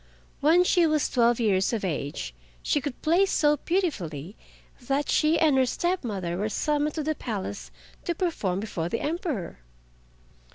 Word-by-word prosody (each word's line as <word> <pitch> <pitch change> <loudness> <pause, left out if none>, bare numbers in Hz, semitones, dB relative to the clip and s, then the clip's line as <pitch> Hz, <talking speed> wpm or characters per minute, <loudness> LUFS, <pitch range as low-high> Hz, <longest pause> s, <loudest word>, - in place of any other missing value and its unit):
When 330 +5 +5
she 355 -2 +4
was 305 -1 +2
twelve 240 -1 +2
years 200 -2 +2
of 215 -4 -1
age 140 - -3 0.3
she 290 - +1
could 285 -3 -5
play 340 +5 +4
so 295 -5 +3
beautifully 210 - -2 0.5
that 275 +1 0
she 310 +1 +3
and 305 -4 +4
her 260 - +4
step 350 +7 -1
mother 185 -7 -3
were 210 +2 -1
summoned 295 +5 0
to 310 - -2
the 310 +1 0
Palace 190 - -5 0.4
to 345 - -1
perform 215 - -1
before 175 -6 -3
the 230 - -1
Emperor. 295 - -3
270 Hz, 160 wpm, -26 LUFS, 190-315 Hz, 0.5 s, When